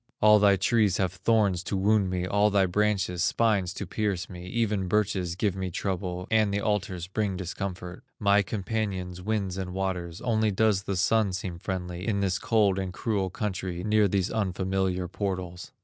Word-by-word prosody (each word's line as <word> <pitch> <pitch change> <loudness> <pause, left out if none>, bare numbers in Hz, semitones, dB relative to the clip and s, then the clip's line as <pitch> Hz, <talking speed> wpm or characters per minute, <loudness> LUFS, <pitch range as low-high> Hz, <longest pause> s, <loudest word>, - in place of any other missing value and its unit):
All 105 0 +6
thy 100 -1 +5
trees 100 0 +2
have 95 -1 0
thorns 100 -2 +2
to 100 - -1
wound 100 0 +2
me, 90 -1 -1
All 105 +2 +3
thy 100 -2 +3
branches, 95 -2 0
spines 100 -3 +2
to 100 - -4
pierce 100 -1 -2
me, 90 0 -8
Even 105 -2 0
birches 95 -3 0
give 100 0 0
me 95 -1 -3
trouble, 90 0 -3
And 110 -2 +3
the 100 - 0
alders 100 -4 -1
bring 95 0 -2
discomfort, 90 -1 -5 0.2
My 100 -1 +4
companions, 95 -2 -3
winds 100 -2 -2
and 90 -1 -5
waters, 90 -3 -3
Only 110 -3 +1
does 105 -1 +2
the 100 - -2
Sun 100 +1 +2
seem 90 -2 -4
friendly, 90 0 -4
In 100 -3 +1
this 95 -1 0
cold 105 -4 +2
and 95 -1 -3
cruel 100 -1 -1
country, 90 -3 -4
Near 105 0 +3
these 95 -1 0
unfamiliar 95 -3 -1
portals." 90 -2 -4
95 Hz, 175 wpm, -27 LUFS, 90-105 Hz, 0.2 s, All